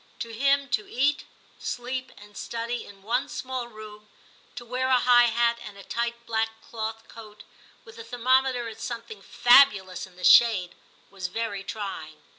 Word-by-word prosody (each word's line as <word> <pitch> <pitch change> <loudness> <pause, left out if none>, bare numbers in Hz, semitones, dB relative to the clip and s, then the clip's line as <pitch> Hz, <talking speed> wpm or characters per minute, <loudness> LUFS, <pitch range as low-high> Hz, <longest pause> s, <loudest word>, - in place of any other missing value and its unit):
To 230 -1 -6
him, 275 +4 +2
to 230 -4 -1
eat, 285 +4 +1 0.3
sleep, 255 +1 -4
and 205 0 -15
study 235 +1 -4
in 195 -1 -15
one 240 +5 -1
small 255 -2 -5
room, 215 -2 -12 0.5
to 240 - -8
wear 255 +2 -2
a 260 -1 +4
high 245 -1 +6
hat 235 0 +1
and 205 -3 -10
a 200 - -11
tight 235 +1 -3
black 225 -1 0 0.2
cloth 225 0 -5
coat, 210 -2 -13 0.4
with 225 0 -14
the 230 - -8
thermometer 250 +1 +1
at 225 0 -9
something 230 -3 -6
fabulous 200 -7 +4
in 185 - -21
the 180 - -13
shade, 195 -5 +6 0.4
was 190 -3 -5
very 200 0 -4
trying. 195 -7 -6
230 Hz, 165 wpm, -26 LUFS, 210-245 Hz, 0.5 s, high